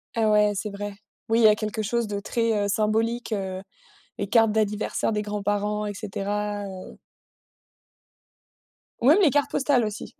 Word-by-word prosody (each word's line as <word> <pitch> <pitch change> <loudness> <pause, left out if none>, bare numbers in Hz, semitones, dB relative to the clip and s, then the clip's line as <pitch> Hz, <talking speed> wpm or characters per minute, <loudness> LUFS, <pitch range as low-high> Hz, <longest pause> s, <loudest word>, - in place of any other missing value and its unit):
Ah 225 -2 +2
ouais, 210 0 +4
c'est 200 +2 -3
vrai. 205 0 -6 0.4
Oui, 225 +1 +3
il - - +3
y - - +9
a 210 - +6
quelque 215 +1 -3
chose 230 +2 -1
de 205 -1 -3
très, 230 +2 -1
heu, - - 0
symbolique, 225 +3 0
heu, 190 -3 -3 0.6
les 200 - -3
cartes 225 0 +4
d'anniversaire 215 0 0
des 210 -1 -1
grands-parents, 205 0 -2
et 205 - -3
cetera, 205 0 -3
heu 190 -1 -9 2.0
Ouais, 275 +8 +5
les 340 - +6
cartes 285 +1 +1
postales 270 -4 +2
aussi. 210 0 -7
210 Hz, 165 wpm, -25 LUFS, 205-225 Hz, 2.0 s, y